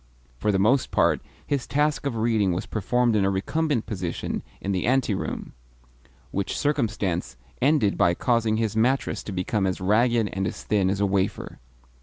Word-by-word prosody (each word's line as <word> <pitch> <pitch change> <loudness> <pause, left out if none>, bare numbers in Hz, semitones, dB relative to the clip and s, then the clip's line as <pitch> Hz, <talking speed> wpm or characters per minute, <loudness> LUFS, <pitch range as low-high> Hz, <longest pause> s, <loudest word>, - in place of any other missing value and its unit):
For 105 - +1
the 95 - +1
most 120 +7 +3
part, - - +2 0.2
his 140 -4 -2
task 150 0 +1
of 130 - -2
reading 110 -4 +2
was 90 +4 -3
performed 120 +2 +1
in 105 - +3
a 95 - +3
recumbent 130 +7 0
position 90 -5 -3 0.2
in 100 - -3
the 95 +1 -1
anteroom; 125 -6 -1 0.8
which 100 0 -2
circumstance 105 - -1 0.2
ended 130 -7 +2
by 85 0 +4
causing 115 -1 +1
his 110 -2 -1
mattress 125 +5 +1
to - - -7
become 95 +2 0
as 95 - -2
ragged 115 +4 +2
and 95 -1 -1
as - - -6
thin 100 -3 +1
as 100 +1 -1
a - - +4
wafer. 95 0 -1
105 Hz, 170 wpm, -25 LUFS, 95-125 Hz, 0.8 s, by